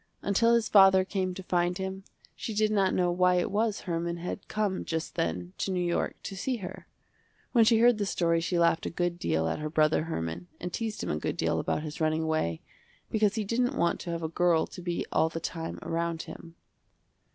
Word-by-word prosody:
Until 230 Hz, +4 st, +3 dB
his 230 Hz, -1 st, +1 dB
father 190 Hz, -2 st, +6 dB
came 185 Hz, -2 st, -2 dB
to 190 Hz, -, -7 dB
find 175 Hz, 0 st, 0 dB
him, 190 Hz, 0 st, -4 dB, 0.3 s
she 220 Hz, -, -5 dB
did 215 Hz, 0 st, +2 dB
not 195 Hz, -3 st, +2 dB
know 180 Hz, -1 st, +2 dB
why 180 Hz, +1 st, +3 dB
it 180 Hz, -, 0 dB
was 215 Hz, +1 st, 0 dB
Herman 170 Hz, -1 st, -2 dB
had 180 Hz, +3 st, -6 dB
come 210 Hz, -3 st, -1 dB
just 160 Hz, -1 st, -3 dB
then 90 Hz, +2 st, -2 dB
to -, -, -1 dB
New 185 Hz, -, 0 dB
York 175 Hz, -, 0 dB
to 195 Hz, -, -5 dB
see 250 Hz, +7 st, -2 dB
her. 185 Hz, -5 st, -8 dB, 0.6 s
When 230 Hz, -3 st, +5 dB
she 225 Hz, 0 st, +5 dB
heard 235 Hz, -1 st, +5 dB
the 205 Hz, -, 0 dB
story 165 Hz, -3 st, +1 dB
she 175 Hz, +1 st, -1 dB
laughed 170 Hz, -1 st, +2 dB
a -, -, -1 dB
good 175 Hz, 0 st, -2 dB
deal 80 Hz, -, 0 dB
at 80 Hz, -, -2 dB
her 155 Hz, 0 st, -3 dB
brother 155 Hz, 0 st, +2 dB
Herman 85 Hz, -, -4 dB
and 180 Hz, -1 st, -5 dB
teased 225 Hz, -2 st, -3 dB
him -, -, -2 dB
a 75 Hz, -, -1 dB
good -, -, -3 dB
deal -, -, +1 dB
about 150 Hz, -, -1 dB
his 155 Hz, 0 st, -6 dB
running 155 Hz, 0 st, +1 dB
away, 155 Hz, -, -1 dB, 0.5 s
because 215 Hz, -2 st, +2 dB
he 220 Hz, -, 0 dB
didn't 245 Hz, +6 st, 0 dB
want 170 Hz, -, +1 dB
to 175 Hz, -, -6 dB
have 170 Hz, -1 st, -3 dB
a -, -, 0 dB
girl 170 Hz, 0 st, +2 dB
to 180 Hz, -, -10 dB
be 175 Hz, -1 st, -2 dB
all 160 Hz, -, +3 dB
the 165 Hz, -, -5 dB
time 165 Hz, 0 st, -5 dB
around 165 Hz, 0 st, -2 dB
him. 165 Hz, 0 st, -11 dB
175 Hz, 220 wpm, -29 LUFS, 165-200 Hz, 0.6 s, father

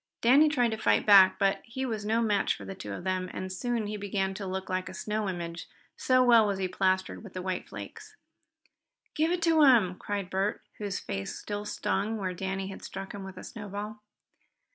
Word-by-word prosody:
Danny 280 Hz, +6 st, +6 dB
tried 245 Hz, -6 st, +2 dB
to 220 Hz, -, -2 dB
fight -, -, +2 dB
back, 195 Hz, -3 st, +8 dB
but 195 Hz, -1 st, +1 dB
he 260 Hz, +3 st, -4 dB
was 220 Hz, -4 st, -3 dB
no 225 Hz, +2 st, +1 dB
match 205 Hz, -3 st, +1 dB
for -, -, -10 dB
the -, -, -6 dB
two 185 Hz, -, -8 dB
of -, -, -6 dB
them, 185 Hz, 0 st, -1 dB
and 185 Hz, 0 st, -5 dB
soon 235 Hz, +3 st, -1 dB
he 210 Hz, +1 st, -4 dB
began 195 Hz, -1 st, -1 dB
to 195 Hz, 0 st, -6 dB
look 190 Hz, 0 st, -4 dB
like 185 Hz, -1 st, -2 dB
a 185 Hz, -, -9 dB
snow 210 Hz, 0 st, -2 dB
image, 170 Hz, -2 st, -5 dB, 0.3 s
so 255 Hz, 0 st, +3 dB
well 235 Hz, -3 st, +6 dB
was 200 Hz, -1 st, -1 dB
he 190 Hz, -1 st, -1 dB
plastered 185 Hz, +2 st, 0 dB
with 195 Hz, -4 st, -10 dB
white 185 Hz, 0 st, -3 dB
flakes. 435 Hz, -1 st, -9 dB, 1.0 s
"Give 320 Hz, +2 st, +1 dB
it 355 Hz, -2 st, -1 dB
to 325 Hz, -1 st, +4 dB
him!" 235 Hz, -10 st, +6 dB
cried 200 Hz, -3 st, -4 dB
Bert, 195 Hz, +2 st, -1 dB, 0.2 s
whose 205 Hz, -2 st, -3 dB
face 95 Hz, 0 st, -5 dB
still 205 Hz, 0 st, -5 dB
stung 210 Hz, +1 st, -1 dB
where 185 Hz, -3 st, -2 dB
Danny 190 Hz, +1 st, -3 dB
had 195 Hz, -, -8 dB
struck 195 Hz, 0 st, -7 dB
him 200 Hz, -1 st, -7 dB
with 190 Hz, -1 st, -9 dB
a -, -, -8 dB
snowball. 210 Hz, -1 st, -6 dB
200 Hz, 210 wpm, -29 LUFS, 190-225 Hz, 1.0 s, back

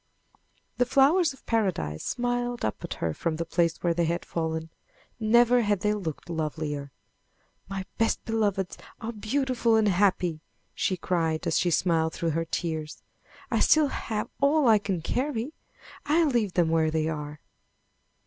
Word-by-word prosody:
The 245 Hz, -, +3 dB
flowers 290 Hz, +6 st, +4 dB
of 265 Hz, -, -16 dB
Paradise 180 Hz, -, -1 dB
smiled 245 Hz, 0 st, -1 dB
up 110 Hz, -, -3 dB
at -, -, -4 dB
her 80 Hz, -1 st, -2 dB
from 165 Hz, -, -2 dB
the 165 Hz, +1 st, -3 dB
place 165 Hz, 0 st, +1 dB
where 170 Hz, -1 st, +2 dB
they 170 Hz, 0 st, +1 dB
had 170 Hz, +2 st, -2 dB
fallen. 160 Hz, -1 st, -3 dB, 0.5 s
Never 240 Hz, +2 st, +5 dB
had 205 Hz, -4 st, +1 dB
they 210 Hz, 0 st, +2 dB
looked 175 Hz, -8 st, -5 dB
lovelier. 155 Hz, -3 st, -3 dB, 0.8 s
"My 195 Hz, -1 st, -4 dB
best 225 Hz, -, +1 dB
beloveds 205 Hz, -5 st, -1 dB, 0.2 s
are 230 Hz, 0 st, -4 dB
beautiful 235 Hz, +1 st, 0 dB
and 220 Hz, -1 st, +3 dB
happy!" 180 Hz, -4 st, +2 dB, 0.3 s
she 185 Hz, -, 0 dB
cried 165 Hz, -3 st, -1 dB
as -, -, +2 dB
she 180 Hz, -, +2 dB
smiled 160 Hz, -1 st, +1 dB
through 165 Hz, -1 st, -1 dB
her 165 Hz, +2 st, -1 dB
tears. 160 Hz, -2 st, -4 dB, 0.5 s
"I -, -, +2 dB
still 310 Hz, -2 st, +4 dB
have 215 Hz, -5 st, -3 dB
all 285 Hz, 0 st, +4 dB
I 220 Hz, -2 st, +6 dB
can 190 Hz, -5 st, -3 dB
carry! 260 Hz, -, -2 dB, 0.5 s
I'll 315 Hz, +1 st, +4 dB
leave 225 Hz, -7 st, 0 dB
them 170 Hz, -3 st, +2 dB
where 160 Hz, -1 st, +2 dB
they 155 Hz, 0 st, 0 dB
are!" 150 Hz, -1 st, -5 dB
190 Hz, 160 wpm, -27 LUFS, 160-235 Hz, 0.8 s, I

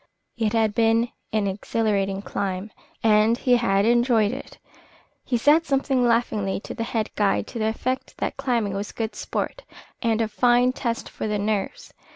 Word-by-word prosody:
It 225 Hz, -2 st, 0 dB
had 220 Hz, -2 st, +2 dB
been 230 Hz, +1 st, +3 dB, 0.2 s
an 215 Hz, -2 st, +1 dB
exhilarating 200 Hz, 0 st, -1 dB
climb, 195 Hz, +1 st, -3 dB, 0.3 s
and 220 Hz, +1 st, +4 dB
he 250 Hz, -1 st, +3 dB
had 200 Hz, -4 st, +2 dB
enjoyed 235 Hz, -2 st, +3 dB
it. 265 Hz, +3 st, -8 dB, 0.7 s
He 245 Hz, -, 0 dB
said 305 Hz, +7 st, +4 dB
something 270 Hz, -2 st, +1 dB
laughingly 230 Hz, -5 st, +1 dB
to -, -, -7 dB
the -, -, -6 dB
head 225 Hz, -2 st, -2 dB
guide 205 Hz, -2 st, +1 dB
to 235 Hz, -, -6 dB
the 220 Hz, -, +1 dB
effect 255 Hz, +4 st, -3 dB
that -, -, -2 dB
climbing 230 Hz, -6 st, -1 dB
was 200 Hz, +1 st, -4 dB
good 225 Hz, -1 st, -3 dB
sport -, -, -3 dB, 0.4 s
and 230 Hz, -2 st, +1 dB
a 225 Hz, -, +1 dB
fine 245 Hz, +3 st, +3 dB
test 235 Hz, -3 st, -3 dB
for -, -, -5 dB
the 210 Hz, 0 st, 0 dB
nerves. 205 Hz, -1 st, -3 dB
225 Hz, 170 wpm, -24 LUFS, 210-240 Hz, 0.7 s, and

